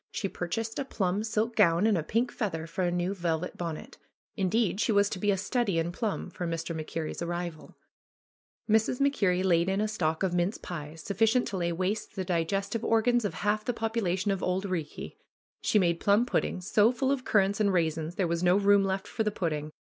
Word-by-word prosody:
She 200 - -2
purchased 225 +6 -4
a - - 0
plum 200 -5 -1
silk 220 +1 -1
gown 175 -2 +4
and 220 -2 +4
a 170 - +1
pink 230 +9 0
feather 165 -7 -3
for 165 +3 -4
a 175 - +2
new 175 +2 -1
velvet 175 -2 -2
bonnet. 165 -3 -6 0.4
In 190 -4 0
deed 220 -1 +1
she - - +2
was 200 -1 +4
to 190 - -3
be 205 - 0
a 195 - +3
study 205 -1 0
in 165 +1 0
plum 215 +2 -3
for 175 - -4
Mr. 165 0 -3
MacKerrie'a 160 +1 -4
arrival. 170 -2 -5 0.9
Mrs. 220 +3 +2
MacKerrie 200 -10 +2
laid 175 -1 +3
in 195 +1 0
a 215 - +1
stock 165 -6 -1
of 185 -2 +1
mince 175 +4 0
pies, 155 -2 -7
suffi 210 +3 +2
cient - - -2
to 195 - -4
lay 170 -1 0
waste 185 +5 -2
the 190 -2 -3
digestive 195 +6 -1
organs 230 +1 +2
of 205 - -2
half 210 +1 0
the 245 - -1
popu 225 0 -1
lation 190 +1 0
of 195 - -4
Auld 185 +2 -1
Eeekie. 170 -6 -4 0.4
She - - +2
made 170 -4 +2
plum 205 +4 +3
puddings, 185 -6 -1
so 215 +2 +4
full 265 +2 0
of 275 -2 -1
currants 200 -2 +2
and 205 -2 +3
raisins, 160 -2 0
there 190 - +1
was 170 0 -1
no 180 0 +4
room 200 0 +5
left 190 0 -1
for - - -4
the 215 - +1
pudding. 155 -6 -3
190 Hz, 215 wpm, -29 LUFS, 170-215 Hz, 0.9 s, room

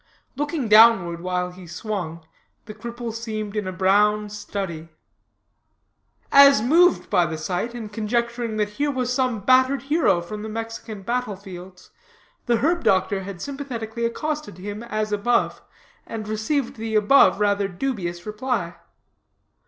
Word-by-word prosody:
Looking 290 -2 -2
downward 210 -6 +6
while 180 0 -2
he 180 0 -12
swung, 170 -3 -5 0.4
the 215 - -8
cripple 235 0 -6
seemed 215 -2 -5
in 210 -3 -2
a - - -2
brown 205 +3 +2
study. 190 -6 -5 1.4
As 280 -3 +8
moved 330 +10 +3
by 175 -2 +3
the 160 0 -4
sight, 180 +9 -3
and 215 -3 -7
conjecturing 235 +1 -2
that 210 -1 0
here 290 0 +2
was 255 -2 -1
some 250 -5 0
battered 260 +3 +3
hero 290 - +2
from 210 +5 -7
the 220 - -6
Mexican 225 -2 -6
battle 240 -1 -2
fields, 185 -1 -12 0.6
the 240 -1 +3
herb 335 +7 +1
doctor 195 +1 +2
had 190 -2 -7
sympathetically 240 -5 -5
accosted 300 - -3
him 205 +3 -6
as 215 -2 -3
above, 235 +4 +1 0.5
and 220 -2 -6
received 225 +5 -2
the 220 0 -3
above 210 -2 +5
rather 205 -1 +2
dubious 180 -4 -4
reply. 210 -5 -3
215 Hz, 140 wpm, -23 LUFS, 195-245 Hz, 1.4 s, As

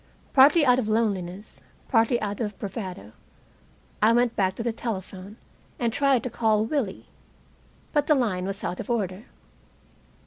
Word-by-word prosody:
Partly 285 +4 +6
out 250 -1 +4
of 220 -4 -2
loneliness, 200 -3 -2 0.3
partly 230 0 +3
out 205 -1 -3
of 210 -4 -3
bravado, 190 - -6 0.9
I 215 +2 +5
went 240 0 +2
back 190 -1 +1
to 230 - -4
the 235 -1 -1
telephone 200 -2 -6 0.4
and 235 -2 -1
tried 275 -2 +2
to 250 - -3
call 220 -2 +1
Willie. 230 -6 -2 0.9
But 295 -2 +1
the 305 - +5
line 195 -8 -1
was 195 +1 -4
out 180 - -3
of - - -6
order. 205 -2 -2
220 Hz, 150 wpm, -25 LUFS, 195-245 Hz, 0.9 s, Partly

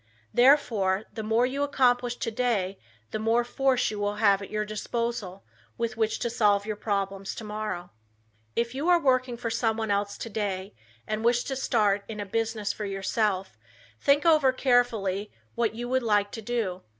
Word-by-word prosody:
Therefore 225 -7 +4
the 220 - -4
more 225 +3 +2
you 270 +3 -2
accomplish 245 -3 +2
today 225 -5 -1 0.3
the 215 - -2
more 225 +2 +2
force 255 0 +1
you 210 - -5
will 205 0 -1
have 200 -2 +3
at 200 - -7
your 215 0 -1
disposal 215 -2 -3 0.3
with 230 -1 -2
which 220 -1 0
to 235 - -2
solve 205 -3 +3
your 215 -1 -3
problems 195 -2 -2
tomorrow. 210 -5 -5 0.6
If 235 +1 0
you 290 +6 -1
are 350 -1 +6
working 255 -4 +1
for 230 -1 -3
someone 225 -2 0
else 200 0 -1
today 200 -3 -3 0.3
and 215 +1 -3
wish 240 +1 +3
to 270 - -3
start 210 -6 +1
in 215 -2 -6
a 205 - -3
business 225 0 -1
for 210 - -5
yourself, 195 0 -1 0.4
think 285 +2 +3
over 305 -5 +5
carefully 225 -6 +1 0.2
what 230 -2 0
you 240 +1 -4
would 260 0 +2
like 205 -3 +1
to 225 - -6
do. 210 -5 -2
220 Hz, 170 wpm, -27 LUFS, 205-245 Hz, 0.6 s, are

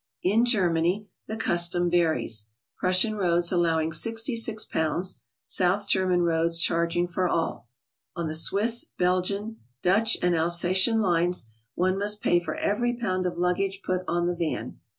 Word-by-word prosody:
In 220 +6 +3
Germany 185 -2 +1 0.2
the 220 - -5
custom 175 -3 0
varies, 160 -11 0 0.3
Prussian 185 +4 +2
roads 175 -4 +1
allowing 165 -3 +1
66 225 - +1
pounds. 170 +4 -1 0.3
South 185 +2 +1
German 185 -2 +2
roads 165 0 +1
charging 170 +1 0
for 180 +1 -1
all. 165 -7 -2 0.5
On 170 -2 -3
the 155 - -4
Swiss, 210 +8 +3
Belgian, 195 +5 -1 0.3
Dutch 210 +5 +2
and 180 -1 +2
Alsatian 175 +7 +2
lines, 175 - +1 0.3
one 185 +2 0
must 210 +1 -1
pay 175 -3 +2
for 165 -3 -5
every 240 +4 -1
pound 185 -6 -1
of 175 - -5
luggage 190 +2 -1
put 185 0 -1
on 175 0 0
the 175 - 0
van. 160 -8 -4
180 Hz, 145 wpm, -26 LUFS, 170-200 Hz, 0.5 s, In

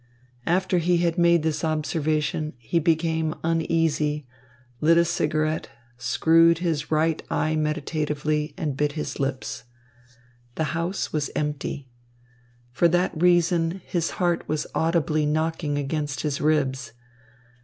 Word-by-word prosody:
After 185 +1 +2
he 175 +1 +2
had 170 0 0
made 170 -2 +4
this 155 -2 -1
observation, 155 -1 -1
he 120 +8 -1
became 160 -1 +1
uneasy, 160 -3 0 0.5
lit 165 +2 +4
a 170 - +5
cigarette, 155 0 -1 0.3
screwed 165 +7 +4
his 165 -4 -2
right 160 +1 +1
eye 155 0 0
meditatively, 150 0 -1
and 155 -7 -2
bit 145 +1 0
his 150 -3 -4
lips. 135 -4 -3 0.9
The 160 - 0
house 170 +3 -2
was 150 -2 -1
empty. 145 -2 -3 0.8
For 150 +8 +3
that 175 +2 +2
reason 175 0 +3
his 170 -2 -1
heart 175 -1 0
was 155 -1 -1
audibly 155 -2 +1
knocking 155 -1 -1
against 145 -1 -2
his 150 -2 -2
ribs. 135 -6 0
155 Hz, 125 wpm, -25 LUFS, 150-165 Hz, 0.9 s, a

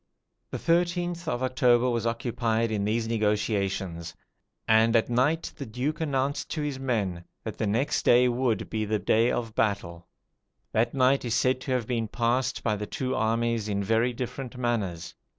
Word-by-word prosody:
] - - -52
The - - -4
13th 175 0 0
of 130 -5 -1
October 125 -1 +3
was 120 -2 0
occupied 115 -1 0
in 105 -2 -1
these 110 +2 0
negotiations; 100 -6 -1 0.5
and 110 +1 +4
at 115 +1 +2
night 140 +7 +1
the 140 - -5
Duke 130 +8 -3
announced 140 -2 -1
to 155 - -2
his 145 -3 -3
men 100 -10 -1 0.2
that - - -6
the 110 - 0
next 130 +9 0
day 125 +1 +5
would, 120 -2 0
be 110 -1 -2
the 110 0 0
day 110 +4 +2
of 115 -3 -2
battle. 90 -6 -1 0.6
That 115 +4 +1
night 135 +1 +3
is 120 -2 -1
said 130 0 +2
to 130 - -4
have 125 -3 0
been 115 -2 -1
passed 120 +3 0
by 110 -2 +1
the 105 0 -5
two 130 -3 -3
armies 115 -1 0
in 100 -1 -1
very 115 +4 +2
different 125 +1 -6
manners. 110 -9 -2
115 Hz, 175 wpm, -27 LUFS, 110-130 Hz, 0.6 s, day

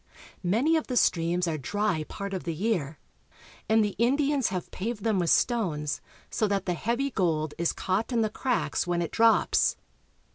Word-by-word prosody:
Many 230 - +2
of 315 - -3
the 250 - -1
streams 175 -2 +2
are 155 -2 -2
dry 195 0 -1
part 200 +4 -6
of 185 - -3
the 165 -2 -3
year, 170 -6 -1 0.7
and 220 0 +4
the 205 - -3
Indi 275 +5 +2
ans 275 -4 +1
have 185 -2 -4
paved 210 +1 -4
them 220 -4 +1
with 170 -2 +1
stones, 165 - +1 0.3
so 215 - +1
that 200 -2 -1
the 180 - 0
heavy 240 - -1
gold 160 - 0
is 170 - +2
caught 195 +7 -2
in 235 -2 +2
the 215 - 0
cracks 250 -6 -1
when 175 -1 0
it 165 - -5
drops. 230 0 +3
200 Hz, 185 wpm, -27 LUFS, 170-230 Hz, 0.7 s, and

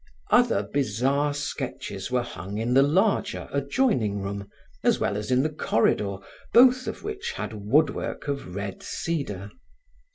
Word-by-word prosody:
Other 245 -1 +4
bizarre 140 +3 0
sketches 135 -8 -4
were 125 -1 +1
hung 100 -2 -7
in 115 +3 0
the 135 - +7
larger, 190 +8 +1
adjoining 140 - +1
room, 100 0 -5 0.3
as - - +3
well - - 0
as 105 0 -4
in 130 +1 +3
the 155 - 0
corridor, 105 -7 +1 0.4
both 255 +1 +6
of - - -5
which 415 -1 -4
had - - -5
woodwork 145 +3 +1
of 140 -11 -4
red 100 -1 -5
cedar. 105 - -3
135 Hz, 140 wpm, -26 LUFS, 100-155 Hz, 0.4 s, the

